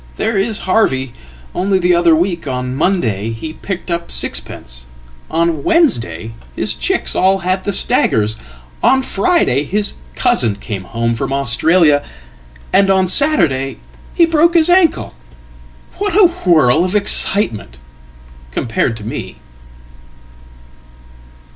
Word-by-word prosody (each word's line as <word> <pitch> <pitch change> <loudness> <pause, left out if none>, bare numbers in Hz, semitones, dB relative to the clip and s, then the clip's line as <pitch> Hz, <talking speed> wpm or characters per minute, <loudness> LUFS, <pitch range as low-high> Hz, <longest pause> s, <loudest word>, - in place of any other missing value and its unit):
There 225 - -1
isHarvey. 195 - 0 0.4
Only 190 +1 0
the 180 -1 +2
other 170 -2 +4
week; 170 -1 -2
on 125 -1 -3
Monday 115 - -1
he 115 +8 -6
picked 185 +1 -6
up 170 0 -3
sixpence, 60 0 -5 0.4
on 165 -2 0
Wednesdayhis 115 - -1
chicks - - -1
all 190 +1 +3
had 185 +1 -1
the 205 - -1
staggers, 110 - +1 0.5
on 265 0 +3
Friday 300 - +1
his 205 +6 -1 0.2
cousin 115 -4 +1
came 100 -2 -7
home 115 +3 -2
fromAustralia, 145 +5 +2 0.7
and 195 0 +4
on 190 -1 +2
Saturday 160 - +1 0.4
he 340 - +5
broke 330 +1 +2
his 335 +1 +5
ankle. 360 -3 +2 0.9
What 405 -3 -1
a 415 -2 +6 0.2
whirl 155 -3 +4
ofexcitement! 185 - +1 0.8
compared 115 - -2
to 105 - -10
me."" 110 - -6
170 Hz, 110 wpm, -15 LUFS, 120-200 Hz, 0.9 s, a